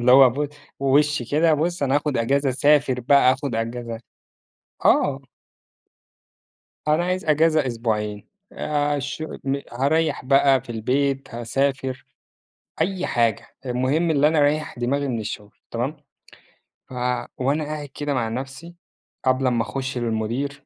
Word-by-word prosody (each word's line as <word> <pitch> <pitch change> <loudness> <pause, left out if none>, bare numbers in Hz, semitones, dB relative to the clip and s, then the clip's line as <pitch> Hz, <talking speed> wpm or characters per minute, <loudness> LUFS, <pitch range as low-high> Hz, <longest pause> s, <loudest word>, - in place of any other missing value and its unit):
اللي 125 +1 +5
هو 130 -1 +8
ب 145 +4 -2 0.3
بوِشّ 140 -2 +2
كده، 155 +2 +4
بُصّ 170 +2 -1
أنا 135 -1 +2
هاخد 145 -2 -1
إجازة، 135 +4 +1
اسافر 140 -1 +3
بقى، 135 0 +5
آخد 135 -1 -4
إجازة 115 0 -4 0.9
آه. - - +4 1.7
أنا 155 +3 +3
عايز 185 +1 -1
أجازة 155 -1 +3
أسبوعين، 105 -4 -2 0.3
الش 145 0 -2 0.2
م 135 +1 -1
هاريَّح 145 +4 +1
بقى 135 0 +4
في 125 -1 -12
البيت، 135 +3 -1
هاسافر، 130 +2 -1 0.8
أي 185 +1 0
حاجة، 115 -3 +1 0.2
المهم 130 +7 +1
اللي 145 -1 +4
أنا 155 0 +2
أريَّح 145 -1 +1
دماغي 140 +4 0
من 120 -3 -2
الشغل، 105 -1 -7 0.2
تمام؟ 130 +7 -2 0.9
ف - - -11 0.4
وأنا 140 +4 0
قاعد 150 -1 -5
كده 145 +1 -4
مع 120 -4 -1
نَفْسي 135 +8 -7 0.5
قبل 130 0 +2
امّا 120 -2 +2
اخش 130 +1 -4
للمدير، 120 +5 -2
135 Hz, 130 wpm, -23 LUFS, 125-150 Hz, 1.7 s, هو